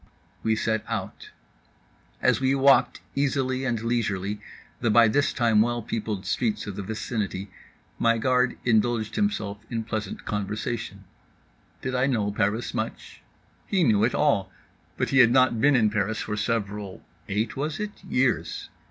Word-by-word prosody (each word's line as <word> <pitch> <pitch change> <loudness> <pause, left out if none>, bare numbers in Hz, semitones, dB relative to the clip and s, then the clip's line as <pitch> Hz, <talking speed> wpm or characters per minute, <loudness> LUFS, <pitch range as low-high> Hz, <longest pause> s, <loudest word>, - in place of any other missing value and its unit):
We 110 0 +1
set 110 0 0
out. - - -5 0.9
As - - +4
we 135 +1 +3
walked 135 0 +4
easily 135 -2 0
and 120 -3 0
leisurely 105 -4 -1 0.4
the 120 - +1
by 115 +1 +6
this 145 +6 +2
time 115 -4 +3
well 120 0 0
peopled 105 -3 -3
streets 110 +3 -1
of 105 - -6
the 100 - -4
vicinity, 105 -1 -4 0.5
my 115 0 +3
guard 125 +1 +2
indulged 115 -1 +1
himself 110 - -1
in 115 -2 -2
pleasant 110 -2 -5
conversation. 105 +3 -3 0.8
Did 130 - -2
I 130 +1 +2
know 110 -6 0
Paris 105 +3 -1
much? - - -5 0.5
He 190 -3 +2
knew 110 -7 +3
it 120 - +2
all. 100 -11 +2 0.5
But - - 0
he 135 - +3
had 120 -3 +8
not 130 -2 +3
been 145 -1 +5
in 110 -4 +3
Paris 105 +1 0
for 105 - -3
several 105 -2 -3 0.3
(eight 105 +3 -1
was 150 +3 -3
it?) 210 -2 -6
years. 135 -8 0
115 Hz, 150 wpm, -26 LUFS, 105-130 Hz, 0.9 s, had